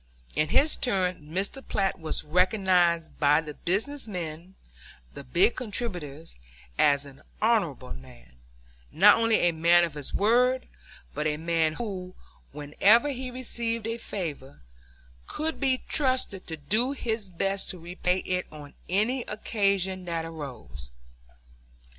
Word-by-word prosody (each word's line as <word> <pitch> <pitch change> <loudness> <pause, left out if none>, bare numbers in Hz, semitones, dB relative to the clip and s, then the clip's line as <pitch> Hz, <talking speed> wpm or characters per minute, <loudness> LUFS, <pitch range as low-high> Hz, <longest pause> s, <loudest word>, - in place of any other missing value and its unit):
In 155 - +2
his 295 - +4
turn 185 - -1
Mr. 195 - -2
Platt 195 -1 0
was 160 -1 -2
recognized 180 -1 +2
by 150 0 +5
the 155 -2 -6
business 225 - -1
men, 175 -1 -6 0.6
the 140 - -8
big 175 - +3
contributors, 180 - -5 0.4
as 145 -1 +3
an 140 -1 -14 0.2
honorable 185 - +1
man; 60 -2 -14 0.6
not 200 +6 +7
only 230 -1 +3
a 175 - +4
man 170 +2 +5
of 170 -3 -1
his 145 -2 -6
word, 250 +4 +2 0.5
but 150 +1 -1
a 150 -1 -1
man 165 -1 +1
who, 185 -3 -6 0.4
whenever 195 - +3
he 260 -2 -4
received 235 -3 -3
a 230 +1 -3
favor, 150 - -6 0.7
could 315 +1 -3
be 265 -2 +1
trusted 255 -9 -1
to 160 - -5
do 220 - 0
his 225 -6 -3
best 195 +2 -2
to 185 - -5
repay 180 +2 -1
it 180 0 -1
on 145 -2 -11 0.2
any 215 +8 +1
occasion 195 -3 0
that 165 -2 -2
arose. 120 - -8
180 Hz, 135 wpm, -27 LUFS, 155-225 Hz, 0.7 s, not